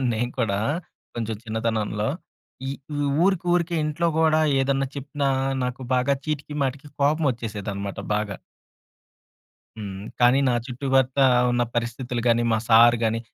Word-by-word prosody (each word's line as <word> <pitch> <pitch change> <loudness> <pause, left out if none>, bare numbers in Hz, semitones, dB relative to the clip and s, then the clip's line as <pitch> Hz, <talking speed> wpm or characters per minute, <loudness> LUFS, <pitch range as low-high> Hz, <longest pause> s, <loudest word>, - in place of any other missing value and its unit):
ఉండేవాడ్ని 130 - +1
నేను 120 +2 -1
కూడా. 105 -5 +1 0.6
కొంచెం 115 -1 -3
చిన్నతనంలో. 110 -1 -1 0.6
ఈ - - -1 0.3
ఊ - - -1 0.2
ఊరికూరికే 175 -2 +1
ఇంట్లో 155 +3 0
గూడా 160 -1 +4 0.2
ఏదన్నా 135 0 +1
చెప్పినా, 140 0 -2 0.4
నాకు 125 +1 -4
బాగా 130 +2 +2
చీటికి 150 -1 -4
మాటికి 135 +2 -3
కోపమొచ్చేసేదన్నమాట 115 -9 -1
బాగా. 105 -2 -2 1.4
హ్మ్. 100 -2 -6 0.2
కానీ, 125 +2 +5
నా 125 - +2
చుట్టుపక్క 130 +1 0 0.3
ఉన్న 120 0 +1
పరిస్థితులు 120 +1 -2
గాని, 120 0 +3
మా 110 - +2
సార్ 120 +1 +7
గాని, 115 +1 0
125 Hz, 125 wpm, -24 LUFS, 110-140 Hz, 1.4 s, సార్